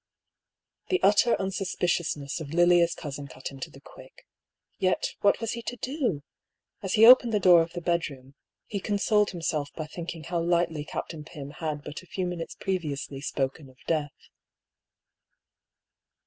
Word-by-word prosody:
The 370 - +2
utter 210 +4 +5
unsuspiciousness 180 -6 -1
of 155 0 -6
Lilia's 175 -1 +5
cousin 145 -2 -6
cut 130 0 -7
him 135 - -11
to - - -5
the - - -15
quick. - - -16 0.5
Yet, 185 -1 +1
what 200 - +4
was 230 -1 -2
he 235 - -4
to 245 - -5
do? 250 - -2 0.6
As 195 -3 -3
he 220 +1 +7
opened 240 -1 +8
the - - +3
door 180 -3 +7
of 165 0 -3
the 175 - -5
bedroom, 145 -6 -2 0.3
he 205 - -4
consoled 210 +1 +2
himself 155 -4 -2
by 155 - -4
think 170 +2 -6
ing 160 - -10
how 170 +1 -2
lightly 170 -3 +1
Captain 155 0 -5
Pym 145 -2 -9
had 150 -2 -4
but 150 - -7
a 185 - -18
few 185 +1 -3
minutes 175 -2 -5
previously 150 -7 -3
spoken 135 0 -3
of 130 - -20
death. 150 -3 -2
170 Hz, 160 wpm, -27 LUFS, 150-195 Hz, 0.6 s, opened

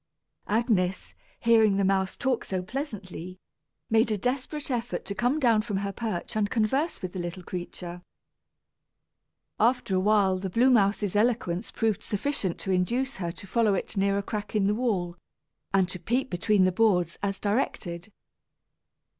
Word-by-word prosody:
Agnes, 205 -5 0 0.3
hearing 220 -4 +5
the 200 - +2
mouse 190 0 +1
talk 260 -3 0
so 185 -1 -3
pleasantly, 185 - -6 0.5
made 225 0 +3
a 215 - +1
desperate 265 +6 -2
effort 240 -1 -2
to 200 - -3
come 245 +7 +1
down 230 -6 +4
from 210 -3 -3
her 200 0 -2
perch 215 -1 -4
and 210 -1 +1
converse 255 - 0
with 185 - -3
the 190 - -4
little 175 +1 -5
creature. 175 0 -6 1.6
After 235 -3 +2
a - - +3
while 195 -2 +3
the 190 0 -3
blue 245 +7 +4
mouse's 205 -3 +2
eloquence 210 -4 +1
proved 220 -2 0
sufficient 210 -4 -2
to 190 - -2
induce 240 +9 0
her 175 -3 -3
to 200 - -11
follow 215 0 +2
it 195 - -4
near 200 0 +2
a 200 - -1
crack 210 +1 -5
in 205 -2 +3
the 205 - +3
wall, 195 -7 -1 0.5
and 190 -2 +3
to 185 - -5
peep 250 +8 -1
between 190 +2 +2
the 185 - +4
boards, 180 -4 +2
as 200 -1 -2
directed. 200 -4 -2
205 Hz, 165 wpm, -27 LUFS, 185-230 Hz, 1.6 s, hearing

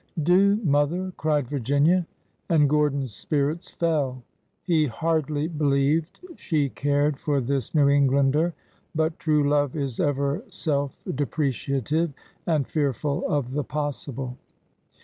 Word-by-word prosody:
" 160 - -4
Do, 190 +5 +5
mother! 165 +4 +1
" - - -43
cried 150 -4 0
Virginia. 145 +7 +2 0.4
And 150 -3 +4
Gordon's 140 -4 +1
spirits 150 - -1
fell. 145 -7 -1 0.4
He 160 -4 +2
hardly 155 +3 -1
believed 150 0 0 0.2
she 150 -5 0
cared 145 +1 0
for 145 -2 0
this 135 +1 -2
New 145 -2 +5
Eng 140 0 +4
lander, 140 +5 +2 0.4
but 160 +1 0
true 150 -3 +2
love 145 -1 +1
is 140 -5 -3
ever 140 0 0
self 145 -4 -2
depreciative 140 +3 -1 0.3
and 155 -5 +2
fearful 145 -1 -1
of 140 -4 -1
the 145 +2 -1
possible. 135 -3 -4
145 Hz, 130 wpm, -25 LUFS, 140-155 Hz, 0.4 s, Do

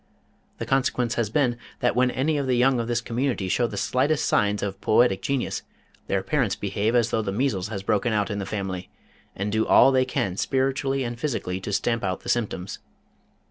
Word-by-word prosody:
The - - -4
consequence 125 -3 +1
has 115 -4 -1
been 120 -1 +1 0.2
that 125 - +1
when 125 0 +3
any 145 +5 0
of 140 - -2
the 125 -1 +2
young 125 0 +3
of 115 - -2
this 120 0 0
community 120 -4 -1
show 120 +6 +1
the 105 - -7
slightest 135 +8 +1
signs 105 -1 +1
of 100 -1 -4
poetic 110 -3 +3
genius 140 -2 -1 0.5
their 95 -1 0
parents 130 -10 0
behave 105 +3 -1
as 120 -1 +2
though 110 - +1
the 100 -2 -3
measles 105 -4 0
had 100 -3 -6
broken 105 +4 +1
out 105 0 0
in 100 - -2
the 100 - -4
family, 95 -3 -4 0.5
and 100 +2 -2
do 110 +1 +1
all 135 - +7
they 130 -1 +3
can 95 -7 -2
spiritually 135 +1 0
and 120 -1 -5
physically 115 -10 -2
to 100 - -5
stamp 115 +3 0
out 95 -1 -2
the - - -7
symptoms. 100 -5 -2
115 Hz, 205 wpm, -25 LUFS, 100-130 Hz, 0.5 s, all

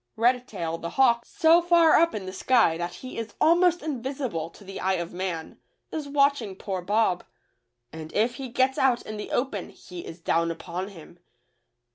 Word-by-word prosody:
Redtail, 220 -9 0
the 170 - -4
hawk, 240 -3 +4
so 330 +1 +4
far 340 -2 +5
up 335 -4 +3
in 200 -3 -4
the 185 - -6
sky 225 -5 +3
that 175 +1 -4
he 255 - -6
is 225 -2 -6
almost 350 +2 +4
invisible 260 - -3
to 200 - -17
the 195 0 -8
eye 190 0 +1
of 170 -1 -4
man, 175 -3 -4 0.3
is 310 -3 -4
watch 280 -1 +3
ing 200 -4 -6
poor 190 -1 -4
Bob, 200 -1 +1 0.7
and 160 0 -8
if 235 +3 +1
he 265 -2 -6
gets 260 +2 +1
out 255 -3 +3
in 215 - -6
the 210 - -6
open 245 -7 -2
he 180 -1 -10
is 165 - -9
down 170 0 +1
upon 175 +3 -5
him. 175 -3 -13
220 Hz, 185 wpm, -26 LUFS, 180-265 Hz, 0.7 s, far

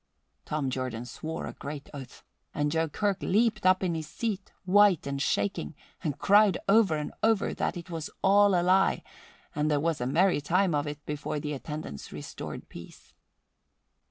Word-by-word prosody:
Tom 145 -3 -2
Jordan 125 -2 -3
swore 160 +6 -5
a - - -6
great 145 0 -7
oath 135 -3 -10 0.3
and 145 0 0
Joe 160 0 0
Kirk 200 +5 -1
leaped 220 -1 +2
up 185 +1 +4
in 180 -2 0
his 160 -2 -4
seat, 205 +2 -4
white 200 -2 +5
and 140 0 -3
shaking, 100 - -1 0.3
and 145 -3 -2
cried 205 +3 +5
over 200 -5 +5
and 150 - -4
over 220 -2 +2
that - - -2
it 175 +1 -9
was 160 -2 -4
all 200 -1 +5
a - - 0
lie, 190 +2 +3 0.5
and 150 +1 0
there 150 -1 +2
was 160 -2 -1
a 125 - -1
merry 175 +3 +3
time 180 +4 +2
of 145 0 0
it 145 0 -7
before 150 0 -3
the 150 0 -4
attendants 145 - -7
restored - - -7
peace. 85 - -13
160 Hz, 175 wpm, -28 LUFS, 145-190 Hz, 0.5 s, white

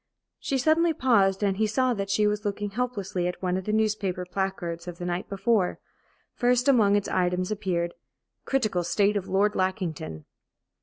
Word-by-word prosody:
She 275 - -1
suddenly 320 +5 +3
paused, 205 -8 +2
and 195 -1 +1
he 215 +1 +2
saw 255 +4 +1
that 195 -3 -4
she 210 +2 +2
was 210 0 0
looking 205 0 -3
helplessly 200 -6 -2
at 180 - -4
one 180 -1 -1
of 190 0 -3
the 210 - -1
newspaper 210 -4 0
placards 180 -2 -3
of 175 -1 -6
the 175 - -5
night 175 +1 -3
before. 200 -1 +1 0.6
First 245 +1 +2
among 215 -7 +5
its 205 - 0
items 180 +1 0
appeared: 180 -5 -1 0.5
"Critical 215 -10 0
state 205 +4 +2
of 200 -2 -2
Lord 205 +2 +2
Lackington." 180 - -3
200 Hz, 170 wpm, -26 LUFS, 180-215 Hz, 0.6 s, among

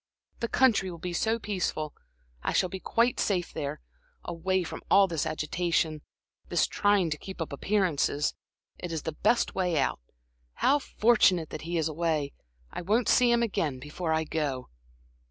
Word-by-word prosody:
"The 235 - -1
country 230 -7 +3
will 170 - -7
be 175 +2 -5
so 220 +6 +1
peaceful. 185 -8 -2 0.5
I - - -1
shall 185 - +2
be 190 - -6
quite 235 +5 +1
safe 180 -4 0
there, 140 - -4 0.4
away 185 +2 -1
from 165 - -7
all 195 -1 +6
this 165 -3 -1
agitation, 155 0 -1 0.5
this - - +3
trying 205 -5 +2
to 155 - -2
keep 190 -1 -9
up 165 -3 -4
appearances. 160 -4 +1 0.5
It 175 - -5
is 160 -2 -3
the 160 - -2
best 215 +9 +1
way 180 -4 0
out. 135 - 0 0.5
How 285 +2 +3
fortunate 210 - +3
that 155 - -6
he 175 - 0
is 160 -1 +1
away! 155 -3 -1 0.4
I - - -5
won't 215 +7 +1
see 245 -1 +5
him 235 0 +3
again 160 - -1
before 155 +5 -4
I 160 0 +2
go." 145 -5 -3
175 Hz, 170 wpm, -28 LUFS, 155-200 Hz, 0.5 s, all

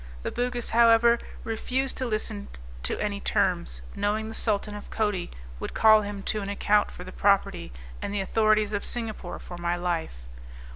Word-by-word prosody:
The - - -2
Bugis, 245 0 -2
however, 235 0 +6 0.2
refused 255 +4 -1
to 260 - -1
listen 215 -2 -2 0.3
to - - -2
any 205 -1 -1
terms, - - 0
knowing 215 +2 0
the - - -7
Sultan 210 -2 0
of 205 - -8
Coti 210 -5 -1 0.3
would - - -5
call 215 -1 +7
him 205 -1 -5
to 215 - 0
an 200 - -4
account 205 +1 +2
for 180 - -9
the 185 - -9
property, 190 - +1 0.3
and - - -3
the 205 - -1
authorities 215 +1 +2
of 205 - -1
Singapore 220 -6 -4
for 175 -1 -9
my 175 0 0
life. 170 - -3
210 Hz, 175 wpm, -27 LUFS, 195-225 Hz, 0.3 s, call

